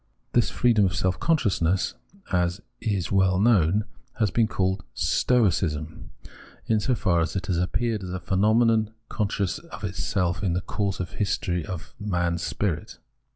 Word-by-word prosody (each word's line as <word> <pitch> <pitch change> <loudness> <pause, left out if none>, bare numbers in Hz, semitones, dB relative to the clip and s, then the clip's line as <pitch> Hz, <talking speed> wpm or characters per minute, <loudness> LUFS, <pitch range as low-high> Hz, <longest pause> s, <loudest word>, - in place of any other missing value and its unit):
This 120 - +3
freedom 115 -4 +3
of 90 - 0
self 95 -1 0
consciousness, 95 - +1 0.4
as 90 0 +1 0.2
is 100 -7 -1
well 95 -2 +3
known, 105 -2 +3 0.3
has 110 -4 +1
been 115 -2 +3
called 95 -2 -1
Stoicism, 85 -9 +1 0.6
in 110 -1 +2
so 125 +4 +1
far 90 -7 +1
as 85 - -2
it 95 -3 -2
has 90 -2 0
appeared 105 +4 0
as 95 - -6
a 95 - -3
phenomenon 110 +4 +2
conscious 100 -4 -1
of - - -11
itself 90 -2 -1
in 90 -4 +1
the 90 - 0
course 100 0 -2
of 90 -2 -4
the - - -12
history 90 -4 0
of 85 0 -7
man's 85 -5 -1
spirit. 95 -4 -2
95 Hz, 155 wpm, -25 LUFS, 90-110 Hz, 0.6 s, This